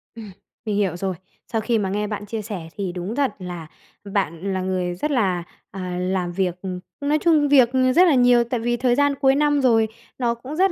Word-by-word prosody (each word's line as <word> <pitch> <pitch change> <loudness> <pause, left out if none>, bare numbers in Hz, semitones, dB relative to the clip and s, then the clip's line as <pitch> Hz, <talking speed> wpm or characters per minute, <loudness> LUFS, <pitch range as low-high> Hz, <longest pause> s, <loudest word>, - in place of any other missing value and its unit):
Ừm, 220 -3 -9 0.3
mình 210 -2 -1
hiểu 195 -4 +1
rồi. 190 0 -2 0.4
Sau 225 - +1
khi 230 +1 +1
mà 200 -3 -1
nghe 210 +2 -1
bạn 205 -1 -5
chia 220 +1 -4
sẻ 200 -6 -6
thì 195 -3 -2
đúng 180 +5 -5
thật 280 -2 +1
là 175 -3 -7 0.5
bạn 195 -1 -1
là 185 - -1
người 185 -1 -2
rất 300 +12 -2
là, 190 -9 +1 0.3
à, 185 -2 -5
làm 180 -1 -1
việc, 180 -1 -1
ừm, 185 -2 -4 0.2
nói 290 +2 +2
chung 310 -4 +4
việc 260 -4 +6 0.3
rất 365 +1 +7
là 310 - +4
nhiều, 245 -1 +5
tại 235 +1 -3
vì 240 +1 0
thời 245 0 +2
gian 285 +1 +2
cuối 270 -1 +3
năm 290 0 +2
rồi 225 -4 +4 0.3
nó 240 -2 +1
cũng 260 +5 -8
rất 380 +3 +3
215 Hz, 225 wpm, -22 LUFS, 185-260 Hz, 0.5 s, rất